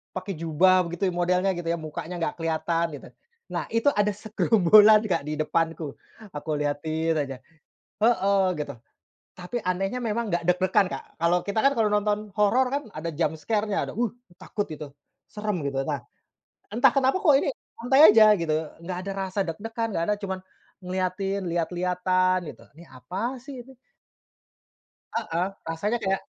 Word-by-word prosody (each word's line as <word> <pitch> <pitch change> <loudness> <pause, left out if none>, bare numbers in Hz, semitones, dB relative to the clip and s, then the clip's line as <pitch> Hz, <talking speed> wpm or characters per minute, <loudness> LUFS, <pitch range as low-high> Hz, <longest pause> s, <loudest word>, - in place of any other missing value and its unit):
pakai 185 +2 -4
jubah, 180 +3 +4
begitu 175 +3 -2
ya, - - -5
modelnya 180 +2 +2
gitu 175 -1 -5
ya, 170 - 0
mukanya 155 +3 -6
nggak - - -1
kelihatan, 165 +1 0
gitu. 140 - -11 0.4
Nah, - - -2
itu 230 +5 +3
ada 210 0 +2
segerombolan, 215 0 +5
Kak, 170 - +1
di 150 - -2
depanku. 160 -2 -1 0.4
Aku 145 +2 -6
liatin 155 +3 -1
aja. 135 -3 -2 0.7
Heeh, 200 -4 +3 0.2
gitu. 145 -1 -4 0.6
Tapi 180 +6 -6
anehnya 195 +6 -1
memang 230 -1 -2
nggak 175 0 0
deg-degan, 185 +3 +3
Kak. - - -6 0.2
Kalau 170 +1 +3
kita 200 +2 -2
kan, 275 - +5
kalau 220 -2 +3
nonton 210 0 +2 0.2
horor 235 +6 +4
kan 285 +1 0
ada 160 +2 -3
jump 160 0 -1
scare-nya, 210 +4 -1
ada, - - -6
"Wih!" 235 -3 0 0.3
takut, 205 - -3
gitu. 150 -2 -7 0.4
Serem 210 -4 -3
gitu. 135 -1 -1
Nah, 145 -2 -2 0.7
entah 230 +4 +4
kenapa, 270 +4 +3
kok 320 -8 +5
ini, 275 - +2 0.3
santai 250 +3 +2
aja, 215 -1 +8
gitu. 160 -2 0 0.2
Nggak 175 +2 -5
ada 195 - -4 0.2
rasa 190 +2 -4
deg-degan, 225 +7 -4
nggak 165 -4 -1
ada, 210 - +2
cuman 190 -2 -3 0.4
ngeliatin, 185 +2 -2
lihat-lihatan, 180 +2 +1 0.2
gitu. - - -18
"Ini 170 - -13
apa 190 - -4
sih, 275 -3 -8
ini?" 265 -1 -16 1.4
Heeh, 185 -6 -1 0.2
rasanya 205 +8 -1
kayak 195 -1 0
185 Hz, 160 wpm, -25 LUFS, 165-210 Hz, 1.4 s, aja